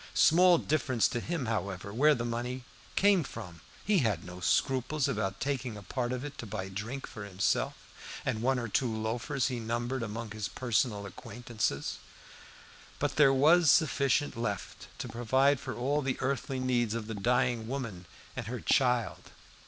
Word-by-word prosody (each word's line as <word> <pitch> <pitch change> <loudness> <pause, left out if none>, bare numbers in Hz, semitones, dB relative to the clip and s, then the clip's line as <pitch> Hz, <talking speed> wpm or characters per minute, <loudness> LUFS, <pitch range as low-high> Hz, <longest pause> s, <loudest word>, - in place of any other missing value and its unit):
Small 180 +2 +6
difference 130 -7 +1
to 120 - -2
him 160 +1 -3
however, 100 -3 -3
where 150 +6 +5
the 120 -1 -3
money 120 +2 -3 0.3
came 200 -2 +5
from. 90 - -9 0.2
He 205 -2 +4
had 105 - 0
no 90 0 -9
scruples 130 - +1
about 95 -2 -2
taking 130 -5 -2
a 105 - -10
part 120 +1 -2
of 125 +2 -3
it 145 - -8
to 115 - -6
buy 95 -2 -4
drink 110 +8 -5
for 105 - -8
himself 95 -1 0 0.5
and 110 - -1
one 130 +2 +2
or 120 -1 -2
two 120 +3 +1
loafers 120 +5 -1
he 125 -2 -3
numbered 120 +3 -2
among 115 0 -5
his 110 -2 -3
personal 115 -4 0
acquaintances. 110 - -3 1.0
But - - -1
there 145 -3 +7
was 155 +5 +5
sufficient 140 0 +3
left 105 -4 -4
to - - -5
provide 130 +4 +2
for - - -5
all 140 +5 0
the 130 -2 -1
earthly 135 0 -1
needs 120 -3 +1
of 115 -2 -3
the 110 - -5
dying 120 +2 +1
woman 115 -9 -5 0.3
and - - -4
her 125 +1 -4
child. 125 -4 +1
120 Hz, 170 wpm, -30 LUFS, 110-135 Hz, 1.0 s, there